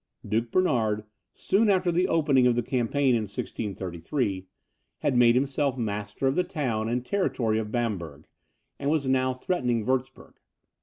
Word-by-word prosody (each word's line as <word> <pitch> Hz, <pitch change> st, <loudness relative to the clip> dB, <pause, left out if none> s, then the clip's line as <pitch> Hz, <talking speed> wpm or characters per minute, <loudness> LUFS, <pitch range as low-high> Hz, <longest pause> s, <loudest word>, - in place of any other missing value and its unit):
Duke 115 Hz, +2 st, 0 dB
Bernard, 115 Hz, -, +1 dB, 0.3 s
soon 210 Hz, +3 st, +2 dB
after 185 Hz, -2 st, +3 dB
the 180 Hz, +2 st, +2 dB
opening 145 Hz, -7 st, +3 dB
of 120 Hz, -, +3 dB
the 120 Hz, -, 0 dB
campaign 130 Hz, +3 st, +1 dB
of 115 Hz, -, +2 dB
1633, 95 Hz, -, -3 dB, 0.5 s
had 140 Hz, -, +1 dB
made 120 Hz, -1 st, +5 dB
himself 135 Hz, 0 st, +1 dB
master 105 Hz, +1 st, -3 dB
of 135 Hz, -, +3 dB
the 180 Hz, -, +1 dB
town 115 Hz, -10 st, -2 dB
and 125 Hz, +1 st, -1 dB
territory 120 Hz, -, 0 dB
of 105 Hz, -1 st, -4 dB
Bamberg, 90 Hz, -, -3 dB, 0.5 s
and 140 Hz, -, -1 dB
was 150 Hz, -3 st, +1 dB
now 130 Hz, -1 st, +1 dB
threatening 125 Hz, -, -1 dB
Wurtzburg. 130 Hz, +1 st, -3 dB
125 Hz, 150 wpm, -26 LUFS, 110-140 Hz, 0.5 s, made